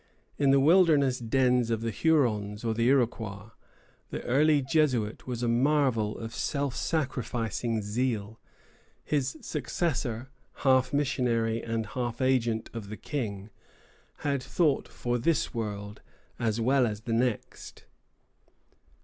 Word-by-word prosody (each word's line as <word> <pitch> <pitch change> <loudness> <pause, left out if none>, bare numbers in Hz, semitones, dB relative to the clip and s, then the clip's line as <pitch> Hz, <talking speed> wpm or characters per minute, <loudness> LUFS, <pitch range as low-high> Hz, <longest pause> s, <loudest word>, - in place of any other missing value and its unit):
In 140 -1 +3
the 135 0 +6
wilderness 150 -4 +4
dens 125 0 +2
of 115 -1 0
the 115 0 -2
Hurons 110 -9 +1
or 115 - +1
the 115 +1 +1
Iroquois, 115 -6 0 0.6
the - - -5
early 145 +3 +3
Jesuit 130 -7 0
was 125 -1 -3
a - - +1
marvel 120 -3 +2
of 115 0 -7
self 140 -1 -2
sacrificing 120 - -2
zeal; 110 0 -2 0.6
his 135 -3 -1
successor, 130 -5 -2 0.3
half 130 -1 +4
missionary 120 -5 0
and 115 -1 -2
half 120 +4 -4
agent 120 -4 +1
of 110 -4 -7
the 110 - -6
King, 105 -8 -4 0.7
had 140 -2 +1
thought 150 +1 +1
for 120 0 -2
this 160 +6 +1
world 105 -2 -5 0.4
as 110 -1 0
well 130 +2 +3
as 105 -1 -4
the 115 0 -3
next. 120 -1 -2
120 Hz, 125 wpm, -28 LUFS, 115-135 Hz, 0.7 s, the